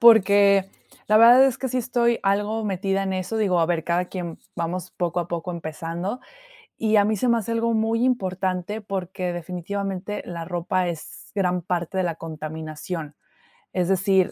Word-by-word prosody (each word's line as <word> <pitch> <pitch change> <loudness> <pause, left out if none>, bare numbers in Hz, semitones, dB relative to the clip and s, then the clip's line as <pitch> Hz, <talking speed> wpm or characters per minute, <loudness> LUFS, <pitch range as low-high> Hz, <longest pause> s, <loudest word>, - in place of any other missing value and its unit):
porque 200 -3 +6 0.4
la 215 - +5
verdad 240 +4 +9
es 265 -3 +1
que 265 - -2
sí 255 - 0
estoy 235 -1 +1
algo 205 +3 +1
metida 195 0 0
en 190 -1 -2
eso, 185 +4 -2
digo, 195 -5 +2
a 165 - +3
ver, 165 -2 0
cada 175 +1 +1
quien 175 -3 -6 0.2
vamos 175 +1 -3
poco 175 0 -1
a 170 - -5
poco 170 +1 -3
empezando. 170 +6 -4 0.6
Y 220 -1 +2
a 205 - +6
mí 215 +1 +1
se 250 - 0
me 235 -1 +4
hace 230 0 -3
algo 230 0 +1
muy 225 +1 +1
importante 190 -4 -1
porque, 185 -2 -3
definitivamente, 190 +3 -4
la 170 -2 -5
ropa 180 +1 -1
es 170 -3 -7
gran 180 -2 +1
parte 175 +1 -2
de 185 - +2
la 170 -2 -1
contaminación. 155 0 -6 0.6
Es 180 -2 0
decir, 190 0 +3
185 Hz, 175 wpm, -24 LUFS, 175-215 Hz, 0.6 s, verdad